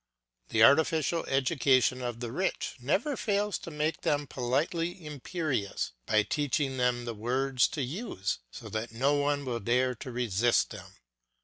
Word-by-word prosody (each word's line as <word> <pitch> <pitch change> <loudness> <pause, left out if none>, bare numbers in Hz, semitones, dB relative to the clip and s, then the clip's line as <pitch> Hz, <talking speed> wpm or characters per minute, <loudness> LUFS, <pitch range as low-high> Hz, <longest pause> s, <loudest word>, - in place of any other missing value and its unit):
The 110 - +4
artificial 160 +4 +4
education 130 -2 +2
of 120 -1 -4
the 120 -2 -4
rich 185 +9 -1
never 190 - 0
fails 205 -3 0
to - - -8
make 155 +1 -2
them 145 0 +1
politely 160 +8 -1
imperious, 150 - -2 0.2
by 105 -1 +4
teaching 145 +2 -1
them 125 -1 +1
the 120 - -3
words 125 +4 +1
to 145 - -3
use 135 - -3
so - - -10
that 110 +1 -4
no 135 +6 +2
one 145 0 +1
will 120 -2 -2
dare 125 +4 +2
to 125 +2 -8
resist 120 -1 +2
them. - - -10
135 Hz, 150 wpm, -29 LUFS, 120-155 Hz, 0.2 s, The